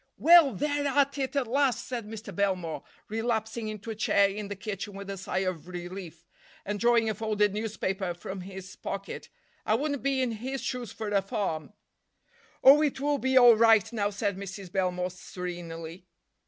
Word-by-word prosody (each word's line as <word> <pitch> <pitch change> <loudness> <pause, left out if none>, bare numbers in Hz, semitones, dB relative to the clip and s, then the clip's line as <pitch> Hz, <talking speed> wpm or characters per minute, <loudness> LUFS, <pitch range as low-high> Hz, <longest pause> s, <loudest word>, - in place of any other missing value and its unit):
"Well, 330 -5 +7
they're 290 +5 0
at 280 0 +2
it, 265 +1 -2
at 275 -2 +2
last," 260 0 +1
said 235 -4 -4
Mr. 220 0 -8
Belmore, 185 -5 -1 0.3
relapsing 220 0 -2
into 215 +1 -6
a - - -5
chair 200 -1 +3
in 200 +1 -5
the 205 - -5
kitchen 205 0 -5
with 200 0 -6
a - - -4
sigh 190 0 -2
of 180 -3 -3
relief, 175 -1 -8 0.4
and 205 +1 -3
drawing 235 0 +4
a 220 - +1
folded 210 -1 +1
newspaper 195 -4 -2
from 190 +2 -7
his 185 0 -9
pocket. 195 0 -6 0.3
"I 215 - +2
wouldn't 285 +2 -1
be 275 0 +1
in 245 - -1
his 250 +4 -4
shoes 245 -5 -3
for 220 -2 -5
a 200 -1 +2
farm." 195 - -3 0.9
"Oh, 280 +3 +9
it 295 -3 0
will 290 0 +1
be 260 +1 +2
all 245 -2 +9
right 225 -1 +5
now," 205 -3 0
said 200 -1 -2
Mrs. 195 -1 -7
Belmore 180 -1 -1
serenely. 175 -2 -7
210 Hz, 180 wpm, -28 LUFS, 190-240 Hz, 0.9 s, Oh